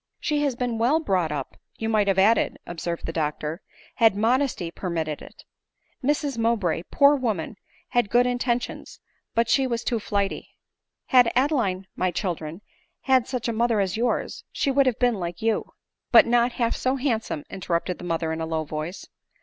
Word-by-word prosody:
" - - -56
She 300 -2 0
has 280 -4 0
been 240 -2 -2
well 260 +8 +3
brought 185 - 0
up, 140 -3 -5 0.2
you 225 - -3
might 215 -2 +2
have 195 -1 +2
ad 200 +4 +6
ded," - - -1
observed 170 0 -4
the 165 - -4
doctor, 155 +2 -2 0.2
" - - -26
had 225 -3 +6
modesty 225 -4 +1
permitted 165 -5 -3
it. - - -13 0.6
Mrs 285 -2 0
Mowbray, 220 -8 +1
poor 285 +1 +5
woman, 220 - -2 0.3
had 240 -4 +1
good 245 +2 +4
intentions; 245 -1 -2 0.4
but 230 0 +3
she 265 +2 +3
was 235 -2 -2
too 235 -3 0
flighty. 200 -2 -2 0.5
Had 250 -3 +6
Adeline, 240 -9 +1
my 185 - +1
children, 170 -1 -4 0.4
had 260 -3 +3
such 250 -3 -3
a 235 - -1
mother 230 -1 +2
as 190 -2 0
yours, 235 +2 -1
she 275 - 0
would 275 0 +3
have 250 - +1
been 245 -4 +2
like 170 -1 -4
you." 225 -1 -1 0.2
" - - -60
But - - +8
not 240 +1 +2
half 235 -2 0
so 255 +1 0
handsome," 230 - -2
interrupted 180 -1 -2
the - - -9
mother 165 -2 -1
in 160 - -4
a 160 - -2
low 160 -1 -1
voice. 155 +4 -5
225 Hz, 190 wpm, -25 LUFS, 175-245 Hz, 0.6 s, But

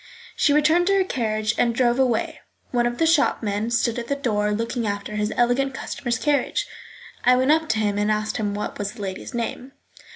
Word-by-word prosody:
She 290 - +3
returned 310 +4 +3
to 395 - +4
her 390 - +4
carriage 215 - -1
and 235 -1 +2
drove 240 0 +2
away. 245 -4 0 0.3
One 240 -1 +2
of 240 0 -3
the 325 - +2
shopmen 225 -9 +1
stood 235 0 0
at 235 - -6
the 280 - 0
door 210 -6 0
looking 230 +2 -2
after 205 +1 -4
his 210 0 -1
elegant 255 +3 +1
customer's 240 -3 -3
carriage. 295 - 0 0.6
I 250 - +5
went 260 +3 +3
up 320 0 +2
to 220 - +1
him 205 -1 0
and 210 +1 +1
asked 215 0 -1
him 205 -2 -2
what 210 - -5
was 205 0 -3
the 225 - -10
lady's 190 +6 -6
name. 245 +3 -4
240 Hz, 205 wpm, -23 LUFS, 215-270 Hz, 0.6 s, I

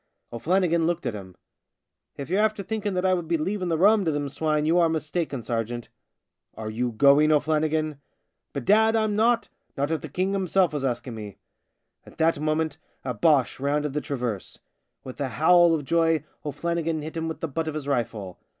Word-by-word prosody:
O'Flannigan 170 +5 +1
looked 175 0 -2
at - - -1
him. 95 -3 -9 0.4
" - - -52
If 140 - -5
you're 190 +6 +1
after 215 -2 0
thinking 210 -2 -3
that 180 +1 0
I 185 - +4
would 175 -3 -2
be 165 0 +1
leaving 185 +3 -2
the 165 - +1
rum 205 +4 +5
to 160 - +2
them 145 -1 -2
swine 150 +1 0
you 165 +3 +3
are 170 -1 +4
mistaken, 155 -4 -2
ser 115 0 -1
geant." 120 +1 -7 0.3
" - - -45
Are 110 -1 -5
you 120 +2 -1
going, 140 +6 +5
O'Flannigan? 155 0 +1
" - - -50
" - - -55
Bedad, 220 - +3
I'm 215 -2 +1
not! 230 +2 +2 0.3
Not 140 +3 0
if 160 - -1
the 155 - -7
King 185 +6 -1
himself 190 -3 +2
was 145 -2 -2
asking 125 -1 -2
me." 105 -3 -8 0.7
At - - -16
that 165 -1 +2
moment 155 0 -1 0.3
a 125 - -1
Boche 135 +4 +2
rounded 145 +1 -1
the 150 - -1
traverse. 120 -9 -4 0.5
With 130 +2 -8
a 135 - -1
howl 170 +3 +5
of 150 -3 -4
joy 165 0 +2 0.2
O'Flannigan 165 +1 -2
hit 155 +2 -7
him 165 0 -2
with 160 - -5
the 165 - -1
butt 160 +3 -3
of 155 - -3
his 150 -2 -4
rifle. 110 -8 -2
155 Hz, 205 wpm, -25 LUFS, 140-175 Hz, 0.7 s, rum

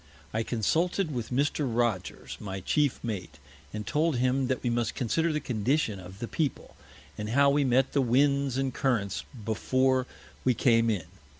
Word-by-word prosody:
I 110 - +1
consulted 160 - 0
with 120 -3 -3
Mr. 140 +1 0
Rogers, 115 -5 -1
my 95 -2 -5
Chief 145 +7 +1
Mate, 90 -9 -5 0.3
and 105 -1 -5
told 155 +3 +1
him 130 +2 +1
that 130 -1 -1
we 120 - +1
must 115 -1 -1
consider 160 +7 +1
the 150 - 0
Condition 120 -3 0
of 95 +1 -11
the 120 - -5
People, 150 +1 -3 0.4
and 105 0 -3
how 140 +4 +4
we 145 +1 +3
met 130 0 +2
the 140 - +3
Winds 135 +1 +2
and 135 -1 -1
Currents 115 -8 0 0.2
before 130 +4 +1 0.4
we 125 -2 +3
came 115 -2 +3
in. 95 -7 -1
125 Hz, 170 wpm, -28 LUFS, 110-140 Hz, 0.4 s, how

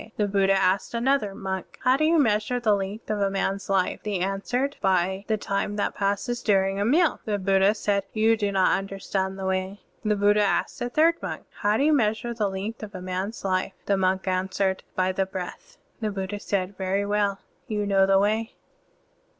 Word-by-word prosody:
The 210 - +1
Buddha 195 -1 +3
asked 195 +4 +1
another 235 -4 +1
monk, 190 -1 -5
"How 255 +1 +5
do 310 +3 +2
you 330 +1 +4
measure 225 -2 +2
the 220 -3 +3
length 200 +2 -3
of 210 - -1
a 200 - +2
man's 195 0 -2
life?" 190 -2 +1
The 210 -2 -2
monk 180 +1 0
answered, 250 +8 -2
" - - -43
By 190 +1 +1
the 220 - +1
time 200 0 -2
that 205 - -1
passes 200 +4 -1
during 195 -1 +2
a 200 - +1
meal." 315 +8 +3
The 210 -2 0
Buddha 195 +1 +3
said, 200 -2 0
"You 220 +1 +3
do 205 -2 -1
not 190 -1 +3
tmder 195 0 -8
stand 190 0 -2
the 190 - -5
way." 190 +1 -2 0.2
The 210 -1 +2
Buddha 205 +1 +3
asked 195 -4 0
a 245 - -1
third 325 +5 +3
monk, - - -5 0.2
"How 210 0 +2
do 275 - +1
you 310 +1 +4
measure 225 -2 +1
the 215 -3 0
length 195 +4 -5
of 210 -2 -8
a - - -5
man's 185 +4 -4
life?" 185 0 0
The 200 - +2
monk 190 0 0
answered, 190 +1 0
"By 185 0 +1
the 190 0 -1
breath." 190 - -7 0.2
The 215 -2 -1
Buddha 195 0 -4
said, 195 -1 -2
"Very 195 +1 0
well, 205 -1 +1 0.3
you 210 -1 -1
know 195 -1 +3
the 195 0 +5
Way." 215 +4 0
200 Hz, 210 wpm, -25 LUFS, 190-215 Hz, 0.3 s, How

